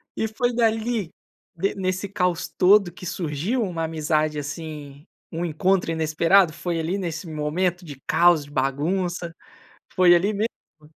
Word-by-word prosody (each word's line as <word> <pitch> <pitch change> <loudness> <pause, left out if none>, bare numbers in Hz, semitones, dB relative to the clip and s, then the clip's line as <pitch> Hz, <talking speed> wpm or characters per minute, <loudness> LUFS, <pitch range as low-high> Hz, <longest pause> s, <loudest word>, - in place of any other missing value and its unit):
E 220 - -1
foi 245 +2 -1
dali, 225 -4 0 0.4
de 195 +4 -1
nesse 185 +1 -2
caos 180 -3 -1
todo 195 -1 +4
que 180 - -11
surgiu 175 - -2
uma 170 -4 -3
amizade, 155 -1 0
assim, 145 -1 -7 0.3
um 165 +1 -3
encontro 175 +2 +1
inesperado? 160 +2 +3
Foi 170 0 -3
ali 170 +5 -1
nesse 170 -2 -4
momento 165 +4 -1
de 145 -3 -10
caos, 170 -2 +4
de 145 - -16
bagunça? 170 +6 -1 0.6
Foi 180 -1 +6
ali 195 +5 +2
mesmo? 160 -7 -6
170 Hz, 140 wpm, -23 LUFS, 155-190 Hz, 0.6 s, Foi